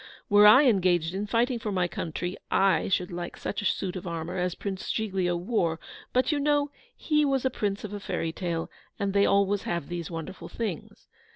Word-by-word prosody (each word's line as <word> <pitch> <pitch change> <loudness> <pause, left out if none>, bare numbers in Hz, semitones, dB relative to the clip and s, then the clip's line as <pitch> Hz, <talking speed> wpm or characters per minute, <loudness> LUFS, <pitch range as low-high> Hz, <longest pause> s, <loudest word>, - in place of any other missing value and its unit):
Were 205 0 +8
I 260 +7 +8
engaged 180 -7 +3
in 200 +2 -3
fighting 235 +3 +1
for 215 -2 -3
my 185 -2 +1
country, 175 +2 -4
I 195 -4 +3
should 180 -1 0
like 175 0 -5
such 205 - -3
a - - -5
suit 190 -1 -1
of 185 0 -6
armour 165 +1 -4
as 180 -1 -1
Prince 195 -2 -5
Giglio 190 -5 0
wore; 170 -4 0 0.3
but, 255 +4 +2
you 295 - +1
know, 290 0 +1 0.3
he 300 -1 +2
was 270 -2 +1
a 260 - +2
Prince 205 -4 -2
of 210 -1 -6
a 205 - -4
fairy 165 -4 -2
tale, 165 -1 -3 0.3
and 200 -1 -1
they 200 0 +4
always 200 0 +2
have 170 -5 -3
these 175 -2 -4
wonderful 170 +2 -7
things. 210 -9 -5
195 Hz, 200 wpm, -27 LUFS, 175-220 Hz, 0.3 s, Were